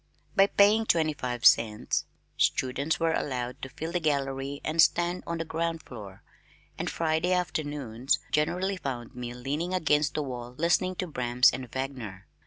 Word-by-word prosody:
By 195 0 +6
paying 210 +3 +4
twenty 160 -2 +2
five 125 -4 -4
cents 110 -2 +4 0.3
students 140 +4 +1
were 165 -1 +2
allowed 125 -4 -3
to 135 - -6
fill 160 +5 -6
the 175 - 0
gallery 140 -2 -1
and 155 +2 -3
to - - +11
stand 175 +2 +1
on 170 - -2
the 165 - -3
ground 165 +1 -2
floor, 100 -6 -10 0.5
and - - -3
Friday 160 +2 0
afternoons 145 -8 -1
generally 180 +6 0
found 125 -7 -5
me 120 -1 -6
leaning 150 +9 -2
against 150 -4 +2
the 150 - 0
wall 125 -2 -7
listening 180 +3 +2
to 185 - -2
Brahms 125 -5 +3
and 125 -1 -6
Wagner. 125 -8 -5
145 Hz, 165 wpm, -28 LUFS, 125-170 Hz, 0.5 s, to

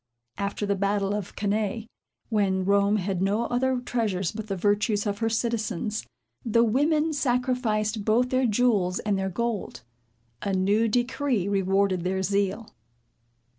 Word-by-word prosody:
After 200 +1 -2
the 200 - +1
battle 200 0 0
of 205 -3 -4
Cannæ, 210 +1 -1 0.4
when 195 -4 +1
Rome 200 +1 +3
had 190 -2 -1
no 205 +4 +1
other 255 +1 0
treasures 210 -8 -1
but 215 0 -6
the 195 - -2
virtues 205 +2 +1
of 205 -1 -2
her 225 -1 +1
citizens, 220 -2 -2 0.4
the 230 0 +3
women 300 +7 +2
sacrificed 245 -5 0
both 235 +4 +2
their 260 -1 +2
jewels 210 -5 +2
and 210 -1 -1
their 190 0 -1
gold. 225 - -3 0.6
A 200 - -2
new 200 +4 +2
decree 245 -2 0
rewarded 195 -2 +1
their 190 +1 -1
zeal. 200 +3 -1
210 Hz, 140 wpm, -26 LUFS, 195-235 Hz, 0.6 s, Rome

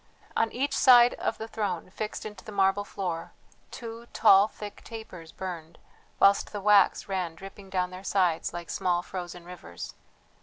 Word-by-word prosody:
On 225 - +1
each 275 +2 -1
side 245 -2 +7
of - - -1
the 220 - -6
throne, 195 -6 -3
fixed 215 +2 -5
into 210 -3 -8
the - - -9
marble 195 0 +2
floor, 180 -5 -5 0.4
two 230 0 -8
tall 200 -2 +6
thick 210 -1 -9
tapers 190 -8 -9
burned, 170 -3 -7 0.4
whilst 200 0 +4
the 205 - -4
wax 205 0 +4
ran 185 -4 -2
dripping 195 +2 -11
down 185 -1 -1
their 185 +1 -9
sides 180 -5 +1
like 170 -1 -6
small 175 -1 0
frozen 175 -2 -7
rivers. 155 - -9
195 Hz, 160 wpm, -28 LUFS, 180-215 Hz, 0.4 s, side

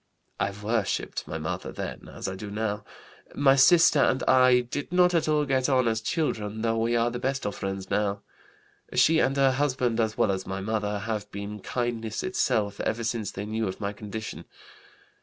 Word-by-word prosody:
I - - +1
worshipped 105 +2 -2
my - - -4
mother - - -4
then, - - -6
as - - -6
I 95 - -3
do 100 +2 -7
now. 105 0 -2 0.5
My 135 -1 +5
sister 155 +3 +6
and 130 -1 +2
I 130 -1 +5
did 140 +6 -5
not 180 0 +4
at 165 -3 +2
all 150 -1 +2
get 130 -1 +1
on 130 -3 +3
as 110 -1 0
children, 110 -7 -2
though 115 0 +1
we 115 +1 +1
are 120 +1 +2
the 120 - -4
best 135 -1 -2
of 105 - -1
friends 95 -1 -5
now. 100 -1 0 0.7
She 160 0 +5
and 135 -2 +1
her 135 -1 +4
husband 130 -4 0
as 110 -1 0
well 100 - +3
as 95 -1 -3
my 95 0 -3
mother 105 0 -1
have 105 -1 -4
been 100 +1 -6
kindness 115 0 -3
itself 110 - 0
ever 115 +1 -1
since 115 -3 -2
they 100 +1 -6
knew 110 0 -2
of 95 - -5
my 100 -1 -3
condition. 105 +1 -7
115 Hz, 195 wpm, -27 LUFS, 105-130 Hz, 0.7 s, sister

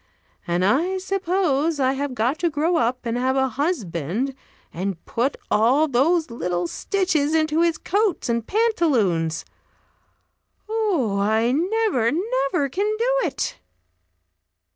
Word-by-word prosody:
And 175 +1 +1
I 330 - +2
suppose 360 -5 0
I 260 0 +2
have 275 -1 -3
got 250 +7 0
to 345 - +1
grow 320 +3 +1
up 245 0 0
and 230 0 -1
have 260 +1 +1
a 265 0 +2
husband, 240 - -2 0.4
and 185 0 -4
put 250 +5 -1
all 255 +9 +4
those 305 +3 +2
little 180 -6 -2
stitches 320 - 0
into 310 0 +2
his 335 -2 +2
coats 405 0 0
and 235 -1 -1
pantaloons. 255 - +1 1.2
Oh, 375 - 0
I 220 +4 +2
never, 350 - +1
never 325 - 0
can 405 +10 -1
do 485 +2 +1
it!" 270 - -4
280 Hz, 125 wpm, -23 LUFS, 230-355 Hz, 1.2 s, all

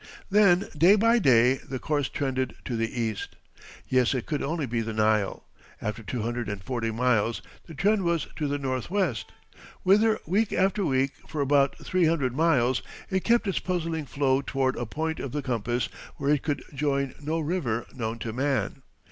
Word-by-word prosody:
Then 195 -2 +5
day 175 +7 +6
by 230 +3 +4
day 125 - +5
the 130 0 -6
course 145 +2 -1
trended 130 -2 -2
to 120 - -2
the 115 0 -1
east. 110 -3 -3 0.5
Yes, 130 0 +2
it 125 - -2
could 150 -3 -2
only 155 0 -1
be 115 -2 -1
the 115 0 -4
Nile. 110 -2 +1 0.3
After 105 +2 -4
two 115 +1 -4
hundred 120 -1 -2
and 100 -2 -5
forty 120 -2 -2
miles 115 -1 +1 0.2
the 165 - -10
trend 205 +6 +2
was 170 -4 0
to 150 - -1
the 145 0 -1
northwest, 135 - -2 0.5
whither, 215 +3 +4
week 200 +6 +1
after 195 +2 +2
week, 135 -3 +1 0.2
for 155 - -5
about 140 0 +3
three 185 -2 +2
hundred 140 -6 +1
miles 130 -6 +3 0.3
it 190 -1 0
kept 235 -1 +3
its 195 - 0
puzzling 165 -4 -2
flow 135 -1 +1
toward 135 -1 0
a 120 - -4
point 160 +6 -3
of 135 - -5
the 145 -1 -2
compass 120 0 -1 0.3
where 140 - 0
it 145 - +1
could 145 -2 -2
join 140 -1 0
no 155 +3 -1
river 150 -8 -1
known 115 -3 -3
to 115 -1 -5
man. 135 +1 -1
140 Hz, 180 wpm, -27 LUFS, 120-165 Hz, 0.5 s, day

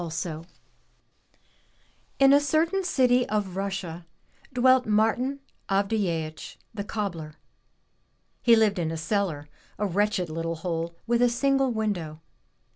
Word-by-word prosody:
Tolstoy 165 -1 -4 1.7
N 275 0 +7
a 285 - +7
certain 320 +6 +1
city 250 -7 +2
of 205 -4 -1
Russia 190 -4 -4 0.4
dwelt 255 0 +4
Martin 225 +6 +1 0.3
Avdyeeich, 195 -6 -1 0.2
the 205 -2 -4
cobbler. 175 -8 -4 1.1
He 235 -1 +6
lived 215 -4 +2
in 165 -2 -1
a 165 - -4
cellar, 165 -4 -2 0.3
a 210 - -1
wretched 205 -1 0
little 165 +1 -3
hole 165 0 -3
with 235 +1 +1
a 245 - +5
single 270 +2 +1
window. 190 -9 -3
205 Hz, 120 wpm, -26 LUFS, 165-245 Hz, 1.7 s, N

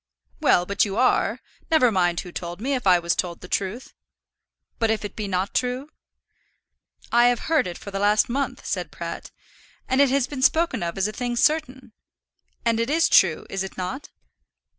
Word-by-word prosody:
"Well, 175 - +3
but 200 +5 +1
you 200 -2 -3
are? 255 +1 +2 0.3
Never 310 -8 +4
mind 175 -3 +1
who 180 - -10
told 175 +1 -6
me, 265 +6 -1
if 250 -6 -2
I 180 -1 +7
was 170 0 0
told 175 -2 -3
the - - -10
truth." 200 +7 -3 0.9
"But 225 - +1
if 220 -1 0
it 205 - -7
be 210 -2 -4
not 190 +1 -2
true?" 255 +3 -2 1.2
"I 240 +1 +5
have 245 -1 +1
heard 315 - +1
it 175 - -6
for 210 -2 -9
the 195 - -3
last 210 +1 +3
month," 275 +3 -3
said - - -3
Pratt, - - -7 0.6
"and 260 +2 +3
it 280 - +5
has 270 -1 +2
been 275 -1 -6
spoken 320 - +2
of 170 +2 -3
as 195 +1 +1
a - - -4
thing 245 +1 -3
certain; 260 -3 0 0.7
and 230 -1 +2
it 230 +2 0
is 325 +2 +3
true; 175 -5 +4
is 195 0 -3
it 190 - -8
not?" 185 +10 -5
225 Hz, 195 wpm, -24 LUFS, 190-260 Hz, 1.2 s, I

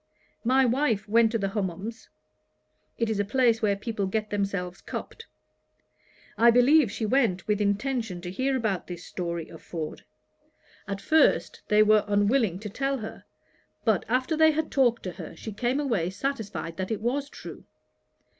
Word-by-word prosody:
My 260 +2 +4
wife 235 -4 +1
went 225 +1 +4
to 230 - +1
the 195 -2 -1
Hummums; 200 +3 -4 0.9
(it 230 - 0
is 220 -2 -1
a - - +3
place 230 +1 +2
where 205 -2 +2
people 205 -1 -3
get 215 +2 -2
themselves 195 -3 -2
cupped.) 460 - -7 1.1
I 235 +1 +7
believe 245 +1 +5
she 220 - -3
went 215 -7 +1
with 210 -1 +1
intention 210 -1 -1
to 175 0 -6
hear 260 +7 0
about 215 -7 -2
this 175 -1 -7
story 170 -2 -4
of 165 - -12
Ford. 160 -3 -6 0.8
At 195 -1 -4
first 315 +7 +3
they 210 0 +5
were 215 0 +5
unwilling 205 -1 +2
to 215 - -5
tell 270 +6 -1
her; 220 -3 -8 0.6
but, 220 -5 +2
after 255 +6 +1
they 315 0 +6
had 315 0 -1
talked 245 -4 +2
to 185 - -4
her, 165 - -9
she 215 +6 -7
came 245 +6 0
away 225 - 0
satisfied 205 -7 -4
that 190 -1 -3
it 220 - -2
was 275 +5 -1
true. - - -10
220 Hz, 165 wpm, -27 LUFS, 195-255 Hz, 1.1 s, I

